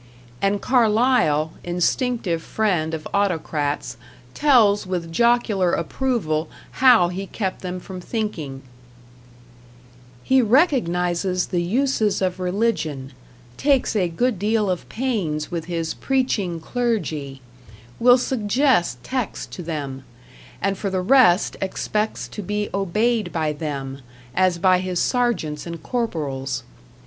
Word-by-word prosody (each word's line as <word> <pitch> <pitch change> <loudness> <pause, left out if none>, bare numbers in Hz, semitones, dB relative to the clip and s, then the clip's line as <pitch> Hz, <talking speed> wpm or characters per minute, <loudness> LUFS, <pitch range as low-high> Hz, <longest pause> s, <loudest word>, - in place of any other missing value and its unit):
And 200 +1 +1
Carlyle, 225 - +3
instinctive 180 +1 0
friend 170 -6 0
of 155 - -7
autocrats, 155 -9 -1 0.4
tells 225 -10 +4
with 175 -3 -3
jocular 220 -3 +2
approval 170 - -1 0.3
how 240 -9 +6
he 190 +2 -5
kept 190 -2 -3
them 180 0 -4
from 185 0 -8
thinking: 165 - -4 1.6
He 260 0 +4
recognizes 185 - +2
the 175 - +2
uses 220 +1 +1
of 185 -1 -1
Religion; 180 - -1 0.4
takes 275 -5 +2
a 185 -4 +2
good 215 +5 0
deal 210 -1 +1
of 180 - -4
pains 200 -13 -2
with 170 -2 -3
his 165 -2 -2
Preaching 225 -10 -1
Clergy; 160 - -2 0.6
will 245 +1 +7
suggest 230 - +1
texts 255 -5 -3
to - - -6
them; 145 -5 -5 0.6
and 195 0 0
for 200 - -2
the 190 -1 -1
rest 210 -3 +4
expects 210 +3 -2
to 210 - -6
be 210 +1 -2
obeyed 215 +4 0
by 155 -2 -1
them, 140 -3 -5 0.3
as 185 +1 +2
by 185 0 +4
his 185 -1 -2
Sergeants 235 - 0
and 170 -2 -7
Corporals. 150 - -2
190 Hz, 120 wpm, -22 LUFS, 165-230 Hz, 1.6 s, will